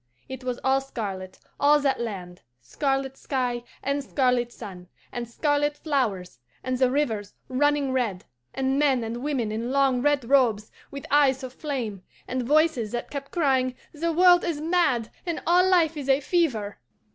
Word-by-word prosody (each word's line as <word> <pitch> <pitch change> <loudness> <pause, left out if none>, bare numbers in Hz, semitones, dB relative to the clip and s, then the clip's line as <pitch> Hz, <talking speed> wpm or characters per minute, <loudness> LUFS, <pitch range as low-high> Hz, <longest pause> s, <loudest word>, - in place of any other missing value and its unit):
It 260 -1 -8
was 250 -1 -3
all 265 0 +3
scarlet, 195 -8 -6 0.2
all 295 +1 +5
that 270 -3 +1
land 185 -6 -6 0.2
scarlet 270 - -2
sky 250 -3 -2 0.2
and 280 +1 -1
scarlet 250 -3 +1
sun, 185 -7 -10 0.2
and 240 -1 -5
scarlet 290 +3 0
flowers, 220 - -2 0.2
and 255 0 -1
the 255 0 +3
rivers 235 -7 -1
running 285 +1 +1
red, 230 -8 -1 0.3
and 265 +1 0
men 270 -5 +3
and 225 +1 -4
women 265 -6 -1
in 230 +3 -3
long 270 -2 +2
red 290 -2 +2
robes, 235 -6 +3 0.2
with 280 0 -8
eyes 275 -2 +4
of 255 -1 -6
flame, 250 - -4 0.3
and 255 0 -2
voices 295 -4 +2
that 240 - -4
kept 280 -1 -5
crying, 265 -6 +1 0.2
'The 335 +2 -1
world 355 +1 +6
is 330 -4 -2
mad, 305 -8 +1
and 340 -2 -3
all 360 +2 +4
life 335 -3 +3
is 280 -2 -5
a 270 +1 +5
fever! 265 - 0
265 Hz, 165 wpm, -25 LUFS, 235-290 Hz, 0.3 s, world